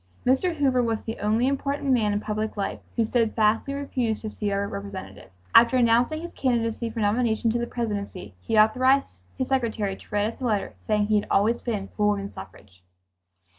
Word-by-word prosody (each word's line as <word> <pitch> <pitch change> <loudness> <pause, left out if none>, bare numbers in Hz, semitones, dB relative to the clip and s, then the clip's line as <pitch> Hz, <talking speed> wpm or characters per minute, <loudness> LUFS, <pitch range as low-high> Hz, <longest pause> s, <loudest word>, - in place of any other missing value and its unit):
Mr. 300 +8 +2
Hoover 265 -4 +2
was 225 -2 0
the 225 - -5
only. 220 +4 +1
important 275 0 -1
man 220 -5 +3
in 205 - 0
public 215 0 -3
life 200 - -2 0.2
who 230 - +2
steadfastly 225 +2 +1
refused 250 -6 -2
to 215 - -4
see 205 -1 -3
our 200 0 0
representatives. 95 - -9
After 235 +2 +7
announcing 245 +7 +2
his 345 - -7
candidacy 235 -2 -1
for 225 0 -4
nomination 220 +2 +1
to 240 - 0
the 235 - -2
Presidency 205 - -4
he 220 - -1
authorized 255 +6 +4 0.3
his 260 - -2
secretary 225 -7 0
to - - -17
write 210 +1 0
us - - -20
a - - -2
letter 210 -4 -1
saying 210 -1 +2
he 210 0 +3
had - - -7
always 225 +4 +2
been 210 -5 -3
for 210 -1 0
woman 200 -1 -1
suffrage. 95 0 -12
225 Hz, 190 wpm, -25 LUFS, 205-250 Hz, 0.3 s, After